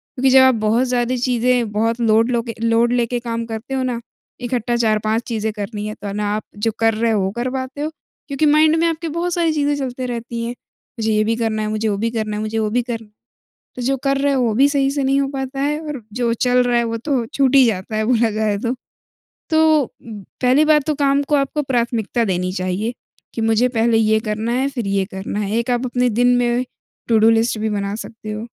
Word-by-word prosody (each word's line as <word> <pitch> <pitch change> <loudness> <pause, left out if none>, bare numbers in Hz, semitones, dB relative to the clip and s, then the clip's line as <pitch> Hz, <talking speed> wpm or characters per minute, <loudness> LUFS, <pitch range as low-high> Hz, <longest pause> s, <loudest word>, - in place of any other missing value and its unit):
क्योंकि 265 0 +2
जब 265 0 +7
आप 260 -1 +5
बहुत 220 +3 +1
ज़्यादा 245 0 0
चीजें 245 -2 +1
बहुत 225 +3 0
लोड 225 +1 +3
लो 240 -1 +1
के - - -3
लोड 230 +1 +3
लेके 240 0 0
काम 230 -1 -4
करते 225 +4 -6
हो 260 -1 0
ना, 245 -2 -2 0.4
इकट्ठा 245 -1 -1
4-5 220 0 +1
चीजें 220 -2 -2
करनी 210 0 -5
है, 215 - -4
तो 200 -1 -6
ना 205 0 -1
आप 215 - -3
जो 225 +2 0
कर 225 0 +3
रहे 225 +1 +1
हो, 210 -3 +1
वो 190 - -1
कर 240 +4 -3
पाते 265 +2 -5
हो 305 +1 -2 0.4
क्योंकि 280 +2 0
माइंड 310 +1 +5
में 335 - +3
आपकी 330 0 -2
बहुत 340 +2 -2
सारी 335 -2 +1
चीज़ें 290 -1 +1
चलती 255 -2 -4
रहती 235 -1 -4
हैं। 235 - -3 0.5
मुझे 220 0 0
ये 215 0 +3
भी 225 +1 +1
करना 220 -2 -1
है, - - -2
मुझे 215 +1 -1
वो 200 - -1
भी 230 +2 0
करना 215 -2 -2
है, 210 - -3
मुझे 215 +1 -2
वो 215 -1 0
भी 245 - +2
करना 230 -2 -5
है। 210 - -26 0.7
तो 250 - -4
जो 270 +2 +1
कर 275 0 +2
रहे 280 0 +1
हो, 260 - +1
वो 230 -3 +1
भी 270 +5 +5
सही 275 -1 +1
से 280 0 -1
नहीं 275 +1 +2
हो 275 - 0
पाता 270 0 -4
है 295 +2 0
और 300 -4 -6
जो 235 0 0
चल 250 +1 +2
रहा 245 -1 +1
है, 235 - +1
वो 230 0 -2
तो 250 0 -1
छूट 270 +2 +1
ही 270 - +8
जाता 215 0 -2
है, 215 - 0
बोला 230 -1 +2
जाए 215 -1 0
तो। 240 +4 -2 0.8
तो 315 -3 +4 0.6
पहली 260 +4 +4
बात 300 -2 +4
तो 305 - +2
काम 280 0 +2
को 295 +1 +1
आपको 280 +2 0
प्राथमिकता 235 -3 0
देनी 180 -2 -1
चाहिए, 185 +5 -2 0.4
कि 230 - -2
मुझे 225 +2 +3
पहले 230 -1 +2
ये 220 0 +3
करना 215 +2 -2
है 260 +2 +1
फिर 240 -7 -4
ये 195 -1 +1
करना 190 +2 -4
है। 205 -1 -2
एक 235 +1 -1
आप 245 +1 0
अपने 250 0 +1
दिन 240 +3 +2
में 240 0 +1 0.5
टू-डू 225 -1 +5
लिस्ट 225 0 +2
भी 220 0 -1
बना 200 0 -2
सकते 220 -1 -8
हो, 215 +2 -5
235 Hz, 240 wpm, -19 LUFS, 220-265 Hz, 0.8 s, ही